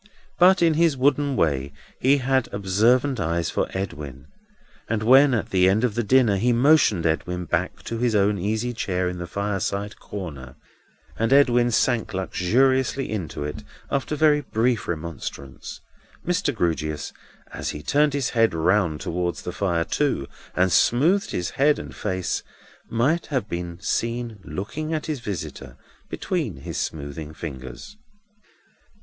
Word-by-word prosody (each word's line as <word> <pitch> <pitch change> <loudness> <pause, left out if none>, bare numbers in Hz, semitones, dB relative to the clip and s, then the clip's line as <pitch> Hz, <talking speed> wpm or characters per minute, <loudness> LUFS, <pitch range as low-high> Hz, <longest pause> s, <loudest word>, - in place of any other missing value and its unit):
But, 185 0 +6
in 165 -1 +4
his 160 -3 +2
wooden 140 +1 +2
way, 70 - 0 0.3
he 135 +3 +4
had 130 -1 0
observant 115 +7 +2
eyes 85 0 -1
for - - 0
Edwin; 75 -8 -6 0.6
and 110 -1 -1
when 135 +3 +6
at 110 - -3
the 95 -1 +4
end 105 +4 +2
of 125 -4 +1
dinner, 120 -5 +4
he 120 +6 +2
motioned 120 - +4
Edwin 90 +2 -1
back 85 +2 -2
to 115 - -4
his 120 -2 +1
own 100 0 +2
easy 110 +6 -1
chair 95 -5 -1
in 90 0 -4
the 85 - -5
fireside 100 +1 -3
corner, 70 -10 -8 0.6
and 115 +2 +1
Edwin 125 -3 +5
sank 120 -2 +1
luxuriously 130 +9 +1
into 85 -9 -4
it 75 0 -5 0.3
after 140 +2 -1
very 150 -1 +4
brief 120 -2 0
remonstrance, 75 -5 -6 0.4
Mr. 180 +2 +1
Grewgious, 80 -6 -2 0.4
as - - -4
he 75 - -6
turned 145 - +2
his 140 -2 -1
seat 115 -6 +3
round 85 -1 +1
towards 85 0 -2
the 90 - -4
fire 85 -4 0
too, 140 - 0 0.3
and 90 0 +2
smoothed 160 - +3
his 90 0 -2
head 145 +2 +3
and - - -8
face, 95 -3 -2 0.5
might 140 +9 +1
have 130 -8 -1
been 85 -2 -5
seen 115 +1 -2
looking 145 - -4
at 155 - -3
his 155 -4 -3
visitor 100 -8 -6 0.3
between - - -2
his - - -5
smoothing 75 +1 -5
fingers. 65 - -8
105 Hz, 145 wpm, -24 LUFS, 85-130 Hz, 0.6 s, But